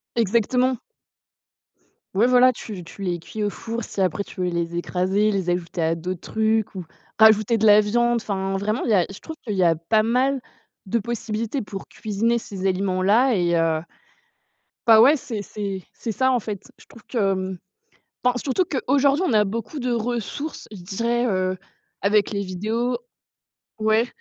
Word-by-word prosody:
Exactement. 235 +3 +1 1.3
Ouais 220 +5 +4
voilà 255 0 +6
tu 205 -6 -8
tu 165 - -13
les 175 -2 -1
cuis 215 +6 -6
au 205 - +1
four 230 +3 -5
si 200 - -3
après 185 +2 0
tu 185 -2 -7
veux 180 - +1
les 170 0 -2
écraser, 190 +4 +1
les 195 -3 -2
ajouter 175 0 -2
à 165 0 +2
d'autres 175 +2 -5
trucs 220 -1 0
ou 185 -2 -5 0.3
rajouter 220 +1 +6
de 220 - -1
la 210 -1 +8
viande 240 +3 +1
enfin, 195 -2 -2
vraiment 215 +4 -1
il 235 - -1
y - - +4
a 180 -3 +3
je 195 - -9
trouve 320 - -8
qu'il 205 -2 -2
y 185 - +2
a 165 -2 +4
pas 215 +7 +2
mal 255 +5 +1 0.5
de 230 +4 0
possibilités 230 +2 -3
pour 195 -1 -8
cuisiner 220 +3 -1
ces 195 -4 -5
aliments-là 195 +6 +2
et 175 -2 +2
heu, 165 -1 +2 1.1
ben 220 -1 +9
ouais 270 +6 +7
c'est 250 -7 -5
c'est 195 -2 -5
c'est 230 - -5
ça 260 +4 +2
en 245 - +2
fait. 205 -2 -6 0.2
Je - - -17
trouve 230 - -16
que 190 -5 0 0.7
enfin 250 0 +3
surtout 270 +8 0
que, 290 -5 -3
aujourd'hui 280 +3 +3
on 265 - +1
a 210 -1 +4
beaucoup 230 +8 -4
de 250 -2 -1
ressources 240 +6 -3
je 190 -4 -9
dirais, 235 +6 -1
heu, 185 -2 0 0.4
avec 205 +1 +2
les 200 - -1
vidéos 220 +6 -2 0.8
ouais, 220 +2 +2
215 Hz, 180 wpm, -23 LUFS, 190-235 Hz, 1.3 s, ben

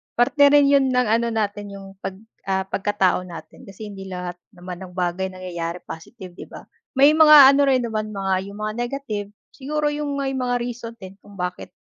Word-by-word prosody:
Parte 285 +4 +4
rin 285 0 +5
yun 275 -1 +4
ng 250 -1 +2
ano 230 +2 +2
natin, 205 -2 -2
yung 195 0 -10
'pag, 190 - -5 0.3
ah, 190 0 0
pagkatao 195 -1 0
natin. 170 -2 -11
Kasi 210 +2 -9
hindi 195 -1 -9
lahat 180 -1 -6 0.2
naman 180 0 -8
ng 180 - -14
bagay 180 +1 -1
nangyayari 175 -2 -6
positive, 185 +3 -10
'di - - -9
ba? - - -11 0.3
May 280 +3 +6
mga 300 -4 +9
ano 280 +1 +3
rin 255 -2 +3
naman 215 -2 -3
mga 195 -1 -1
yung 200 +1 -10
mga 215 0 -2
negative, 240 -4 -4 0.2
siguro 295 +2 -2
yung 295 -1 -3
may 270 -1 -2
mga 250 -2 -1
reason 235 -1 -6
din 195 -3 -12
kung 205 0 -17
bakit, 180 -1 -5
215 Hz, 190 wpm, -22 LUFS, 190-265 Hz, 0.3 s, mga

